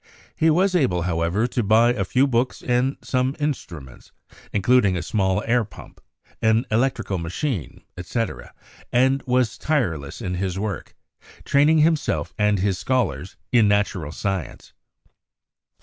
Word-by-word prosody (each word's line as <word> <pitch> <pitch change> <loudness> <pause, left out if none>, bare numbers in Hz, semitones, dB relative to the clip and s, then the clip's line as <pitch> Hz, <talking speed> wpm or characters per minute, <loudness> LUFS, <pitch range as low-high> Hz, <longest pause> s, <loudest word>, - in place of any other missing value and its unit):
He 160 - +3
was 185 +4 +3
able, 95 - +1
however, 85 +5 0
to 125 0 -1
buy 115 +3 +4
a 100 - -1
few 130 +8 +2
books 125 -1 -1
and 125 +2 +1
some 130 +1 0
instruments, 85 - -5 0.4
including 100 -2 +3
a 85 - -3
small 95 +1 0
air 120 +1 +2
pump, 110 - -14 0.4
an 110 +2 +3
electrical 110 -5 0
machine, 90 - -4
etc., 115 +6 -4 0.4
and 130 +2 +3
was 125 -2 +1
tireless 85 - -1
in 95 -6 -4
his 90 0 -2
work, 100 -3 -4 0.5
training 145 +3 +4
himself 160 -2 0
and 105 0 +3
his 95 0 0
scholars 120 -3 -1
in 115 -4 +5
natural 100 -6 0
science. 95 +1 -4
110 Hz, 135 wpm, -23 LUFS, 95-130 Hz, 0.5 s, in